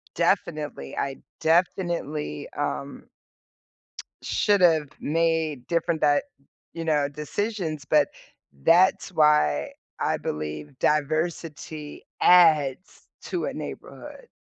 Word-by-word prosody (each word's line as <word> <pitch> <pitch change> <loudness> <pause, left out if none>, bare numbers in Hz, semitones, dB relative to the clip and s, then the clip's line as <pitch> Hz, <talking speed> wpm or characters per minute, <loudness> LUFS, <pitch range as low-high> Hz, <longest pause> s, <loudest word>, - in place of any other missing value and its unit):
definitely, 150 - -1
I 135 -1 -2 0.2
definitely, 165 - 0
um - - -4 1.1
should've 170 -7 +3
made 160 -4 0
different 170 -1 0
that 145 -1 +3 0.5
you 165 -1 -5
know, 150 -3 +2
decisions, 155 +1 -3
but 150 0 +3 0.5
that's 185 +3 +4
why 150 - +3 0.3
I - - 0
believe 75 - -5
diversity 155 0 -2 0.2
adds 160 -3 +4 0.2
to 355 - -3
a - - -3
neighborhood. - - -9
155 Hz, 85 wpm, -25 LUFS, 145-170 Hz, 1.1 s, that's